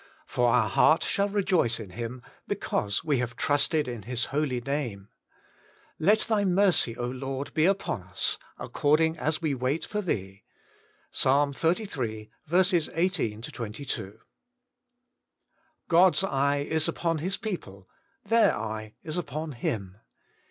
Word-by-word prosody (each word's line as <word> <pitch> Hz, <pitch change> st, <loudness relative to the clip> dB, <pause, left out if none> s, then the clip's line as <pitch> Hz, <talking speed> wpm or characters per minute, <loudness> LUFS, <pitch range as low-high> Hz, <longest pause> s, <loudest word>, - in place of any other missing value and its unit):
For 120 Hz, -1 st, +1 dB
our 115 Hz, -2 st, +3 dB
heart 155 Hz, +9 st, +4 dB
shall 200 Hz, +1 st, +1 dB
rejoice 185 Hz, -, +2 dB
in 105 Hz, -5 st, -8 dB
Him, 120 Hz, +4 st, -6 dB, 0.2 s
Because 100 Hz, -1 st, -1 dB
we 145 Hz, -5 st, +1 dB
have 120 Hz, -1 st, -3 dB
trusted 145 Hz, +1 st, +2 dB
in 120 Hz, -3 st, -5 dB
His 120 Hz, +1 st, -2 dB
holy 140 Hz, -4 st, 0 dB
name. 120 Hz, -7 st, -4 dB, 0.9 s
Let 205 Hz, +7 st, +4 dB
thy 215 Hz, -3 st, +1 dB
mercy, 185 Hz, -, +3 dB
Lord, 130 Hz, +3 st, -4 dB
be 160 Hz, +2 st, +3 dB
upon 195 Hz, -, 0 dB
us, 95 Hz, +2 st, -1 dB, 0.2 s
According 160 Hz, +2 st, +1 dB
as 155 Hz, +2 st, -1 dB
we 155 Hz, -3 st, +1 dB
wait 130 Hz, +4 st, -1 dB
for 210 Hz, -, -2 dB
thee.' 95 Hz, -, -3 dB, 0.4 s
— -, -, -36 dB
Ps. -, -, +1 dB
xxxiii. 140 Hz, -, 0 dB, 0.6 s
18 165 Hz, -, 0 dB
22 115 Hz, -3 st, -5 dB
(kt.). 110 Hz, -, -23 dB, 1.7 s
GOD'S 180 Hz, +2 st, +5 dB
eye 140 Hz, -4 st, +1 dB
is 160 Hz, -1 st, +1 dB
upon 165 Hz, -2 st, -1 dB
His 185 Hz, +5 st, -1 dB
people: 100 Hz, -, -6 dB, 0.4 s
their 230 Hz, 0 st, +4 dB
eye 110 Hz, 0 st, -5 dB
is 155 Hz, +1 st, -4 dB
upon 155 Hz, -1 st, -4 dB
Him. 100 Hz, -6 st, -4 dB
140 Hz, 130 wpm, -27 LUFS, 115-165 Hz, 1.7 s, GOD'S